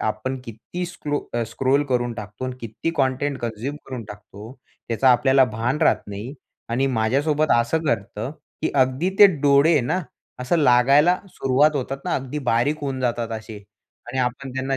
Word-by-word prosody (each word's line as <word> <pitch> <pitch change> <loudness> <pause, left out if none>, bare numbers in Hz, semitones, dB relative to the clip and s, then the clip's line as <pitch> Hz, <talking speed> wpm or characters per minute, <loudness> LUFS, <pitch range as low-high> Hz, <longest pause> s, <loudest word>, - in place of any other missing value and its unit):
आपण 110 +5 -2
किती 115 +11 -6
स्क्लो 150 -4 -3 0.2
अ, 120 - +1
स्क्रॉल 135 +5 +1
करून 120 -3 -1
टाकतो 105 +2 -7
आणि 130 -1 -4
किती 115 +7 -4
कंटेंट, 135 +1 0
कन्झ्यम 120 +5 -4
करून 125 -4 -6
टाकतो 105 +2 -11 0.4
त्याचा 120 +3 +2
आपल्याला 130 +2 +4
भान 125 +6 -1
राहत - - +3
नाही 105 +7 -7 0.3
आणि 130 +4 +1
माझ्यासोबत 140 +6 +1
असं 120 +7 +1
घडतं, 110 -3 -2 0.3
की - - +1
अगदी 130 +9 -1
ते 205 - +11
डोळे 145 +2 +5
ना 160 +10 -1 0.4
असं 125 +7 +1
लागायला 140 +6 +5
सुरुवात 145 +2 +2
होतात 135 +1 -3
ना - - -1
अगदी 135 +2 -3
बारीक 125 +7 +1
होऊन 135 -2 -3
जातात 120 -2 -1
असे 110 -1 -10 0.5
आणि 130 +2 -5
आपण 130 +2 -2
त्यांना 135 +1 -1
130 Hz, 165 wpm, -22 LUFS, 115-145 Hz, 0.5 s, ते